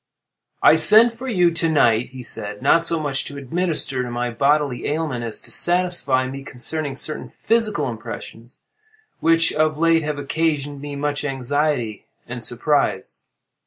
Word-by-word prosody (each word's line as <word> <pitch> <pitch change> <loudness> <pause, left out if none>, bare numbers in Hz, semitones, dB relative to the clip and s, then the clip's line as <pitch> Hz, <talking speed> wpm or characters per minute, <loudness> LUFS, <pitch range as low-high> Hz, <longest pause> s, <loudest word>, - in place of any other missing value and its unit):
"I 160 - +7
sent 220 +8 +6
for 250 +3 -8
you 180 -8 +2
to 165 0 0
night," 120 -6 +2
he 130 -1 -10
said, 105 -3 -3
"not 165 - +4
so 165 -1 +3
much 145 -3 -1
to 145 - -8
administer 150 -2 -1
to 125 - -4
my 120 0 -3
bodily 140 +1 0
ailment, 150 -5 -2
as 115 -2 -4
to - - -9
satisfy 175 -8 +2
me 135 +1 -7
concerning 135 +3 -3
certain 155 +3 -3
psychal 215 -9 0
impressions 115 0 -9 0.6
which, 165 0 +3
of 155 0 +1
late, 165 0 +3
have 150 -1 -3
occasioned 145 -1 -2
me 145 0 -6
much 145 0 -2
anxiety 135 -4 -2 0.2
and 120 -1 -6
surprise. 140 +6 -1
145 Hz, 155 wpm, -21 LUFS, 125-165 Hz, 0.6 s, I